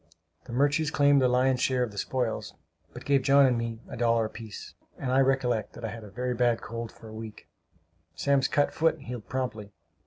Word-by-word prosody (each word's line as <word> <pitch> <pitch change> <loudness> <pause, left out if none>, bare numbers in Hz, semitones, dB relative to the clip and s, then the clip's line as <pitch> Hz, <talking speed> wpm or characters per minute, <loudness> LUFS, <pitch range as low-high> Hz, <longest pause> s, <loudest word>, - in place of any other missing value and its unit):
The - - -10
Murches 145 +4 +2
claimed 145 -2 +4
the 130 - +4
lion's 125 0 +2
share 130 -1 +2
of 120 - -3
the 100 - -13
spoils, 125 -1 -2 0.4
but - - -10
gave 140 -1 +3
John 140 +1 +6
and 125 -2 +3
me 115 -1 -3
a - - -7
dollar 115 -1 +2
apiece; 110 -1 -8 0.2
and 130 - -3
I 130 - +4
recollect 130 -4 +1
that 115 - -7
I - - -2
had 115 +1 -8
a 105 - -10
very 125 +4 -2
bad 120 -1 +2
cold 115 +1 -6
for 115 - -14
a 110 - -10
week. 110 -1 -9 0.7
Sam's 140 -1 +2
cut 145 - +1
foot 160 0 +2
healed 120 -4 -8
promptly. 110 -6 -4
125 Hz, 210 wpm, -28 LUFS, 115-135 Hz, 0.7 s, John